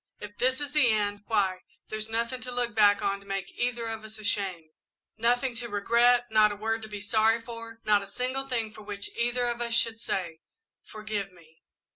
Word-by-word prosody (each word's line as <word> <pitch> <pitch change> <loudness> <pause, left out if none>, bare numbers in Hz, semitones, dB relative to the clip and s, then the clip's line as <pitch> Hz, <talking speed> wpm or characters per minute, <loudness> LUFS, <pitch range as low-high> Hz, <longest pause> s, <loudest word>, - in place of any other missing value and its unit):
"If 205 0 -9
this 260 +2 +2
is 290 -1 -4
the 295 -5 +5
end, 205 -1 0
why, 195 -5 +1 0.3
there's 215 0 -3
nothing 235 +3 -1
to 250 0 -6
look 245 -1 -1
back 205 -1 +5
on 200 0 0
to 200 - -17
make 195 -1 -3
either 240 -1 -2
of 225 -1 -4
us 220 0 -9
ashamed, 195 -6 -2 0.4
nothing 245 +3 +1
to 235 0 -5
regret, 235 +4 +4
not 215 -1 +5
a - - -4
word 225 +2 -1
to 220 - -6
be 210 -1 -5
sorry 220 +3 +3
for, 230 -1 -9
not 210 -1 +4
a 200 - -8
single 255 +5 -2
thing 230 -4 -2
for 215 - -11
which 205 -1 -6
either 240 +1 +1
of 240 0 -2
us 235 -1 0
should 230 -1 +2
say 170 -7 -3 0.4
'Forgive 215 -2 -4
me.' 160 -3 -21
220 Hz, 205 wpm, -28 LUFS, 205-240 Hz, 0.4 s, the